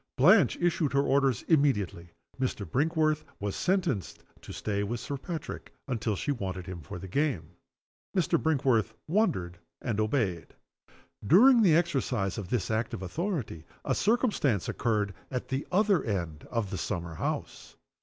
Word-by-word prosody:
Blanche 185 - +6
issued 170 -4 +1
her 140 0 +3
orders 135 -4 +2
immediately. 105 - +1 0.3
Mr. 125 -6 -1
Brinkworth 155 +2 +1 0.2
was 100 -1 -3
sentenced 175 - -1 0.2
to - - -10
stay 100 -1 -2
with 115 +4 -2
Sir 140 - -4
Patrick 160 +4 -6 0.2
until 115 -4 -1
she 145 - -2
wanted 95 -8 -4
him 90 -2 -7
for 75 - -8
the 95 +2 -8
game. 115 - -1 0.7
Mr. 170 -2 +2
Brinkworth 125 -8 +2
wondered, 95 - 0 0.2
and 110 -3 -2
obeyed. 110 - -1 0.7
During 235 - +7
the 175 -7 +5
exercise 130 - 0
of 95 -4 -6
this 120 -3 -1
act 110 +2 -1
of 95 - -7
authority 140 - -3 0.2
a - - +1
circumstance 205 - +1
occurred 105 -4 0 0.2
at 125 -2 -4
the 135 +2 -2
other 200 -1 +3
end 85 -8 -3
of 115 -5 -2
the 95 - -3
summer 85 -5 -3
house. 80 - -4
125 Hz, 150 wpm, -29 LUFS, 100-160 Hz, 0.7 s, During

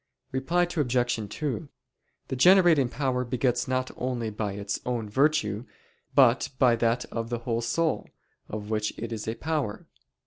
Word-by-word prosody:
Reply 150 +7 +1
Obj. 125 -9 0
2: 130 - -3 0.6
The - - -2
generating 170 -3 +6
power 125 0 -1
begets 125 0 0
not 130 0 -1
only 120 -3 -2
by 105 -1 -3
its 100 0 -3
own 120 -3 -2
virtue 120 -3 +1 0.5
but 130 -3 +5
by 125 -3 +5
that 115 +1 +1
of 115 0 -3
the 120 - -1
whole 115 -2 0
soul, 160 +7 0 0.4
of 105 0 -5
which 105 -1 -1
it 115 - -5
is 110 -1 -5
a 110 - -1
power. 145 -8 -2
125 Hz, 150 wpm, -27 LUFS, 110-135 Hz, 0.6 s, generating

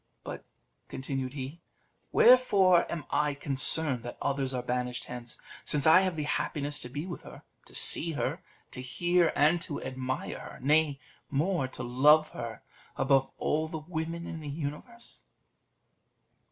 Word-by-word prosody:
But," - - -7 0.4
continued 130 -1 -4
he, 140 +4 -7 0.5
"wherefore 195 -8 +5
am 165 -3 -4
I 150 -1 +1
concerned 140 -1 +1
that 120 +1 -8
others 135 -1 -1
are 125 -2 -3
banished 125 0 -2
hence, 120 -1 -7 0.2
since 145 -2 0
I 160 +4 +8
have 185 -3 -1
the 155 - -2
happiness 145 0 -2
to 125 - -6
be 145 +6 -5
with 175 -2 -7
her, - - -12 0.2
to - - -11
see 165 0 +5
her, 145 - -2 0.3
to 125 - -6
hear 175 +6 +2
and 155 +4 +3
to 150 -4 -4
admire 130 0 -4
her; - - -10
nay 145 +1 +2 0.3
more, 155 0 0
to 130 -1 -8
love 150 +6 +5
her 115 -2 -7 0.3
above 135 -1 +3
all 155 +1 0
the 160 0 -5
women 165 +1 -5
in 165 - -6
the 150 -2 -7
universe?" 150 - -7
145 Hz, 155 wpm, -29 LUFS, 130-165 Hz, 0.5 s, I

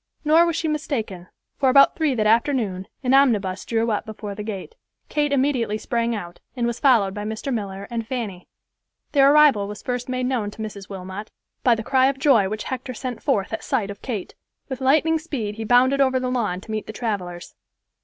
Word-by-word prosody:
Nor 325 +3 +5
was 335 - -1
she 325 - -1
mistaken, 230 - -3 0.3
for 270 - +4
about 275 +2 +6
three 310 -5 +1
that 215 -2 0
afternoon, 220 -5 +1 0.2
an 255 0 +2
omnibus 210 -9 +3
drew 230 0 0
up 210 - -1
before 210 -1 -7
the 205 - -7
gate. 210 - -6 0.4
Kate 295 -1 0
immediately 260 -6 +1
sprang 235 +1 -1
out, 175 -4 -7 0.2
and 240 -2 -1
was 235 0 -2
followed 230 -9 +4
by 205 - -5
Mr. 220 +5 -3
Miller 200 -3 -4
and 230 -2 -3
Fanny. 220 -8 -5 0.6
Their 275 -1 +6
arrival 290 -9 +5
was 210 0 -8
first 250 0 -3
made 255 0 -1
known 245 -5 -1
to 215 - -10
Mrs. 200 -2 -8
Wilmot 190 +2 -7 0.3
by 245 -2 +5
the 225 - -5
cry 260 +2 +3
of 275 0 0
joy 260 -8 +4
which 215 +1 -4
Hector 255 -1 -5
sent 250 -1 -5
forth 220 -8 0
at 220 - -3
sight 220 -7 -1
of 200 - -11
Kate. 220 -8 -5 0.4
With 260 -1 -5
lightning 310 +4 +3
speed 235 -10 -4
he 225 - -4
bounded 255 +4 +4
over 260 -1 +3
the 255 0 -2
lawn 210 -8 -1
to 220 - -10
meet 215 -1 -3
the 220 - -6
travelers. 185 -7 -4
235 Hz, 205 wpm, -23 LUFS, 205-265 Hz, 0.6 s, about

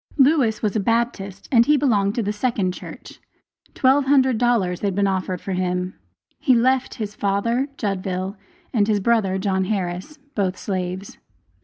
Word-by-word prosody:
Lewis 270 -6 +3
was 210 0 0
a - - +2
Baptist, 200 -3 -1
and 235 -3 +6
belonged 235 -8 +2
to 235 - 0
the 205 +1 -1
second 210 -4 0
church. - - -11 0.6
Twelve 265 +2 +3
hundred 265 -4 +3
dollars 210 -8 +1
had 200 -3 -1
been 200 0 +2
offered 185 -2 -1
for 195 - -6
him. 180 0 -1 0.5
He 260 -4 +4
left 260 +2 +2
his 210 -2 -5
father 220 +7 0
(Judville), 190 -2 -2 0.4
and 210 -4 +2
his 210 -2 +2
brother, 200 -3 +1
John 190 -1 0
Harris, 185 +6 -3 0.2
both 190 -3 -1
slaves. 185 0 -4
205 Hz, 155 wpm, -22 LUFS, 190-240 Hz, 0.6 s, and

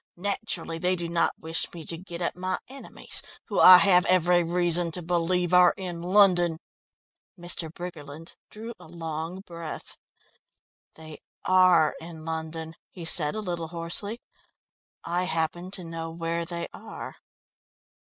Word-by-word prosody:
Naturally, 180 -4 -3
they 180 +2 +2
do 170 -1 -4
not 170 0 +1
wish 160 0 -2
me 165 -2 -8
to 165 - -1
get 170 0 -7
at - - -1
my 185 0 -2
enemies, 270 +1 -7 0.3
who - - 0
I 185 0 +11
have 180 -1 +5
every 180 -1 +4
reason 175 0 +1
to 180 - -3
believe 175 +1 0
are 180 0 +6
in 175 -3 -5
London." 175 -3 +4 0.8
Mr. 175 -2 -5
Briggerland 165 -2 -9
drew 225 +2 -8
a - - -13
long 165 +2 -5
breath. 170 -4 -8 1.0
"They 155 -1 -11 0.3
are 185 -4 +5
in 160 -1 -10
London," 160 0 -5 0.2
he 175 -3 -9
said 155 -1 +2
a 215 - -3
little 175 -4 -3
hoarsely. 170 +7 -2 0.8
"I 175 +2 -1
happen 175 +1 -2
to 190 -1 -4
know 165 -1 -5
where 165 0 -3
they 170 0 -4
are." - - -9
170 Hz, 145 wpm, -27 LUFS, 165-180 Hz, 1.0 s, I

